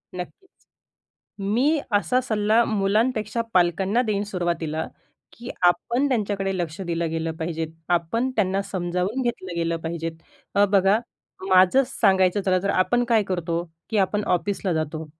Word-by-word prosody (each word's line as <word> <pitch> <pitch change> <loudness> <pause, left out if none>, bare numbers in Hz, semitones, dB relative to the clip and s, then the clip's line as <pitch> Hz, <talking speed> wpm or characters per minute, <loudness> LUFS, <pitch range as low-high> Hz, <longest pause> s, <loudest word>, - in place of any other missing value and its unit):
नक्कीच, 275 - -10 0.7
मी 240 +11 +1 0.2
असा 250 +5 +2
सल्ला 220 -1 +2
मुलांपेक्षा 215 +2 0
पालकांना 190 +6 +2
देईन 210 -4 -1
सुरुवातीला, 170 -5 -2 0.5
की 235 +1 -9 0.2
आपण 235 +10 +2
त्यांच्याकडे 200 -6 -1
लक्ष 170 +1 -4
दिलं 170 -2 -2
गेलं 165 0 -2
पाहिजे. 160 0 -3 0.2
आपण 175 +9 0
त्यांना 195 -2 +1
समजावून 185 +6 -2
घेतलं 190 -7 -3
गेलं 165 0 0
पाहिजे. 165 0 -3 0.4
अ, 200 - +5
बघा 195 +1 +4 0.5
माझं 185 +7 +5
सांगायचं 190 -6 +2
झालं. 185 -1 +1
तर 200 - +1
आपण 240 +7 +2
काय 225 -3 +4
करतो, 170 -2 -2 0.3
की 220 - -1
आपण 205 +2 +1
ऑफिसला 190 +1 0
जातो. 155 0 -3
195 Hz, 135 wpm, -24 LUFS, 175-215 Hz, 0.7 s, अ